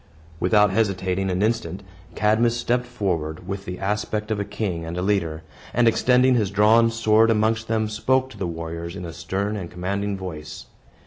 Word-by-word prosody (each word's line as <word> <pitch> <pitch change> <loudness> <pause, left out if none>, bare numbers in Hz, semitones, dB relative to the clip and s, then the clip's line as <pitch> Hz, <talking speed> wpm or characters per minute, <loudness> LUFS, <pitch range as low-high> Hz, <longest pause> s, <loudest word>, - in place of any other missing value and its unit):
Without 105 -2 +4
hesitating 95 -2 0
an 90 +2 0
instant, 100 -4 -1 0.3
Cadmus 115 +3 +2
stepped 125 +1 0
forward, 90 -8 -3
with 100 0 -5
the 90 0 -5
aspect 105 +2 -2
of 105 - 0
a - - 0
king 100 -4 -3
and 85 +2 -5
a - - -1
leader, 85 -6 0 0.3
and 120 0 +4
extending 125 +3 +4
his 110 -5 +1
drawn 110 +3 +5
sword 115 0 +3
amongst 110 0 +1
them, 110 -1 0
spoke 130 +5 +1
to - - -12
the 95 - -1
warriors 85 +1 -5
in 95 - -6
a 85 - -7
stern 95 +5 -3
and 90 -5 -5
commanding 100 +3 -3
voice. 80 -5 -7
100 Hz, 180 wpm, -23 LUFS, 90-110 Hz, 0.3 s, drawn